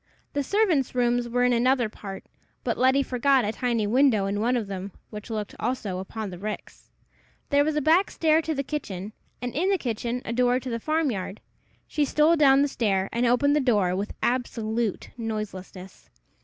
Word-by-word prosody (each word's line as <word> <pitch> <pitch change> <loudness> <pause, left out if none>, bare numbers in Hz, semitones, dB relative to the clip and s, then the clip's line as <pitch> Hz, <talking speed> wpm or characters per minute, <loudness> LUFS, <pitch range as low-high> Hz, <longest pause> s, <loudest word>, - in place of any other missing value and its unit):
The 285 - 0
servants' 340 - +1
rooms 240 -1 +1
were 245 +1 +1
in 250 0 +3
another 245 0 +3
part, 195 -2 -9 0.4
but - - 0
Letty 260 +2 +3
forgot 260 -1 +2
a 210 - 0
tiny 235 -2 -1
window 230 -2 +3
in 200 +1 -1
one 245 +3 +2
of 225 - -2
them, 195 0 -6 0.2
which 210 +1 -8
looked 215 -2 -4
also 215 -6 -2
upon 205 +2 -5
the 180 - -8
ricks. 210 +2 -7 0.6
There 285 0 +5
was 310 0 -1
a 300 - +1
back 340 +6 +4
stair 320 0 +2
to 320 -1 -2
the 275 - -1
kitchen, 210 -9 -5 0.3
and 245 - -3
in 350 +8 +1
the 395 - +3
kitchen 240 - -3
a 230 - -3
door 250 +1 +2
to 260 -1 -6
the 230 - -2
farm 310 +2 0
yard. 195 0 -5 0.5
She 300 - 0
stole 300 +3 +3
down 280 -3 +5
the - - +2
stair, 195 -8 0
and 240 +1 +1
opened 285 +4 +3
the - - +4
door 205 -9 +2
with 200 +2 -4
absolute 235 -3 -1
noiselessness. 195 -4 -6
245 Hz, 195 wpm, -26 LUFS, 210-275 Hz, 0.6 s, There